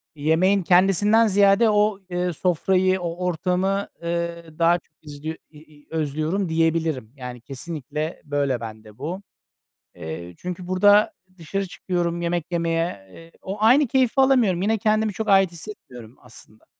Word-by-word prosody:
Yemeğin 170 +6 +2
kendisinden 195 +5 +4
ziyade 200 +2 +4
o, 210 -1 +2
eee, 180 0 -1
sofrayı, 185 +3 +1
o 175 +1 -4
ortamı, 185 +3 0 0.2
eee, 170 0 -3
daha 170 +1 +4 0.2
izliyor 150 +1 -7
i 155 - -17 0.2
i 145 - -22
özlüyorum 160 +4 -1
diyebilirim. 160 -7 0
Yani, 125 -3 -8
kesinlikle 150 +3 -6
böyle 140 -3 0
bende 110 -2 -10
bu. 175 +7 -5 0.7
Eee, 85 +2 -7
çünkü 180 0 -6
burada 205 +3 +4 0.2
dışarı 195 +4 -3
çıkıyorum 175 -1 -2
yemek 170 0 -2
yemeye, 165 - -1
eee, 165 - -14
o 195 +2 -5
aynı 255 +6 +5
keyfi 255 -1 +2
alamıyorum, 245 -10 +3
yine 220 +3 +1
kendimi 215 +1 +1
çok 220 +3 -4
ait 195 -2 +5
hissetmiyorum 130 - -11
aslında. 115 -2 -17
170 Hz, 135 wpm, -23 LUFS, 155-195 Hz, 0.7 s, aynı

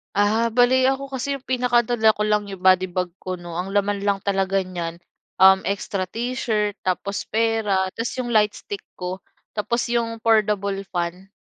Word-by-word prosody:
Ah, 215 +3 +2
bale 250 +2 +4
ako 275 +1 -4
kasi 275 +1 -3
yung 260 - -33
pinakadala 240 -3 +3
ko 210 0 -2
lang 210 0 +2
'yong 195 - -7
body 185 0 +5
bag 180 0 -1
ko 185 -1 -6
'no. 175 -1 -8
Ang 180 +3 -3
laman 205 0 0
lang 200 -1 +1
talaga 195 0 0
niyan, 175 -3 -5 0.4
um 190 0 +7
extra 200 -1 -2
t-shirt, 220 -1 -2
tapos 190 +2 -2
pera, 220 -4 +1
ta’s 230 +1 -2
'yong 250 - -2
lightstick 210 -3 0 0.2
ko. 180 +1 -5 0.3
Tapos 235 +3 -1
'yong 230 -1 -1
foldable 210 -3 +1
fan. 175 +1 -3
205 Hz, 165 wpm, -23 LUFS, 190-230 Hz, 0.4 s, um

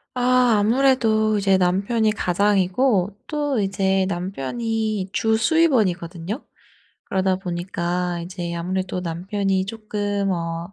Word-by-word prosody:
아. 255 0 +3 0.2
아무래도 220 -2 +3
이제 195 -1 +3
남편이 200 +5 +1
가장이고 200 +2 +1
또 290 -4 -1
이제 195 -1 +1
남편이 200 - -2
주 220 0 +2
수입원이거든요. 215 - +1 0.6
그러다 190 -1 0
보니까 175 -1 -3
이제 175 0 -5
아무래도 185 +2 -2
남편이 190 +3 -1
쪼끔 205 -2 -2
어 170 0 -3
195 Hz, 255 characters per minute, -22 LUFS, 180-220 Hz, 0.6 s, 아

